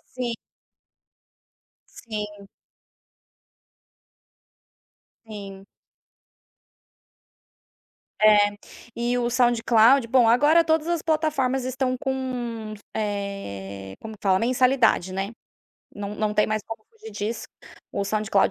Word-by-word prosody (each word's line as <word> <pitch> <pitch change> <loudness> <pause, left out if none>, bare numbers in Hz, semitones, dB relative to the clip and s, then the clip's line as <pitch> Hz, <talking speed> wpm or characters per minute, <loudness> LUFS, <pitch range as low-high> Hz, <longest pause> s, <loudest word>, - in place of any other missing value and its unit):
Sim. 245 -2 -2 1.6
Sim. 210 -3 -7 2.8
Sim. 195 -2 -9 2.6
É, 205 -1 +5 0.4
e 240 +1 0
o 240 -1 0
SoundCloud 240 0 +4
Bom, 245 -1 +4
agora 295 +8 +5
todas 320 -1 +1
as 340 -2 0
plataformas 295 -5 0
estão 255 0 -1
com, 245 -5 -4 0.2
eh, 100 - -5
como 220 - -8
que - - -24
fala 190 -2 +3
a - - -2
mensalidade, 250 -5 +2
né? 195 +2 -3 0.6
Não 205 0 -5
não 210 0 -1
tem 210 - +4
mais 215 0 -1
como 225 -1 -8
fugir 445 0 -12
disso, 215 +2 -4 0.5
o 200 - -1
SoundCloud 215 0 +1
225 Hz, 95 wpm, -24 LUFS, 205-255 Hz, 2.8 s, É